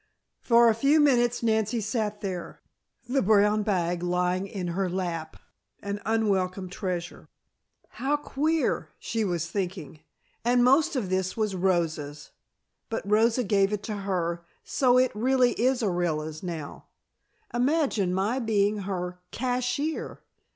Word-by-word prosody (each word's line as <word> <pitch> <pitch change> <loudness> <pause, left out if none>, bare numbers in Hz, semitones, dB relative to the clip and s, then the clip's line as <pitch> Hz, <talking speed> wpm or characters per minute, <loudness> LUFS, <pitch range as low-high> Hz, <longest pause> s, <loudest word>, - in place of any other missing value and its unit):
For 235 -1 +5
a 225 - +5
few 275 +7 +3
minutes 240 -5 +3
Nancy 220 0 +1
sat 215 -1 -2
there, 185 -4 -5 0.4
the 265 +2 +1
brown 210 +1 +4
bag 175 -4 0
lying 180 +2 0
in 190 -3 -4
her 185 +2 -1
lap, 175 -3 -4 0.4
an 200 0 -5
unwelcome 195 -4 0
treasure. 180 -2 -5 0.6
"How 280 +3 -1
queer!" 305 +2 -1
she 225 -1 -2
was 175 -4 -1
thinking. 175 -4 -4 0.4
"And 245 +1 +3
most 275 +5 +4
of 210 -8 -2
this 185 +1 -1
was 215 -3 0
Rosa's. 160 -5 -1 0.6
But 225 -3 -4
Rosa 225 +4 +3
gave 195 -1 +2
it 210 -1 -3
to 215 -3 -4
her, 175 -4 -2 0.2
so 255 -2 +3
it 255 0 +4
really 250 +3 +3
is 250 +1 +1
Orilla's 160 -5 -1
now. 165 -5 -6 0.7
Imagine 250 - +1
my 200 +8 0
being 210 -3 +1
her 180 -2 -4
cashier!" 255 +5 -2
205 Hz, 130 wpm, -27 LUFS, 180-240 Hz, 0.7 s, For